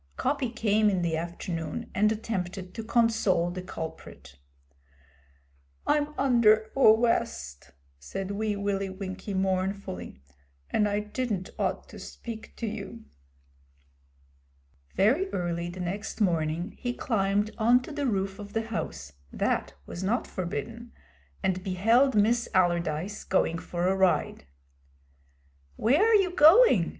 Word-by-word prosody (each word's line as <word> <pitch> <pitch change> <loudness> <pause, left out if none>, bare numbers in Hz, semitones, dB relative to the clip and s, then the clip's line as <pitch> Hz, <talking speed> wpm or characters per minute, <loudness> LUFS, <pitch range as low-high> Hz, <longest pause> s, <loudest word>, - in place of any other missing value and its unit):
Coppy 270 -2 0
came 215 -2 +2
in 185 -3 0
the 165 -2 0
afternoon 165 -1 -5
and 210 +2 +3
attempted 190 -4 -4
to 225 - -5
console 220 -7 +2
the 185 +1 -5
culprit. 70 - -8 1.5
'I'm 300 0 +1
under 220 -5 +4
awwest,' 220 - +2 0.3
said 185 - -5
Wee 210 +1 -1
Willie 200 -1 -1
Winkie 190 +1 -6
mournfully, 190 - -2 0.5
'and 210 - +2
I 205 +1 0
didn't 210 -3 -3
ought - - -1
to - - -11
speak 225 -2 -9
to - - -4
you.' 220 +1 -6 1.9
Very 270 - +3
early 175 -1 -2
the 180 +1 -9
next 190 +6 -4
morning 170 -1 0
he 245 -1 -2
climbed 205 -2 0
on 240 +3 +4
to 315 - -8
the 290 -2 -2
roof 195 -3 -1
of 205 0 -9
the 225 - 0
house 70 - -5 0.2
that - - -1
was 175 - -7
not 225 +7 0
forbidden 185 +7 -5 0.5
and 185 -1 0
beheld 225 +8 +3
Miss 230 +3 +2
Allardyce 175 +1 0
going 165 -3 +1
for 175 +1 -2
a 190 - +2
ride. 190 - +1 1.3
'Where 265 - +3
are 450 +1 +5
you 380 -3 +3
going?' 315 - +7
200 Hz, 125 wpm, -28 LUFS, 180-230 Hz, 1.9 s, going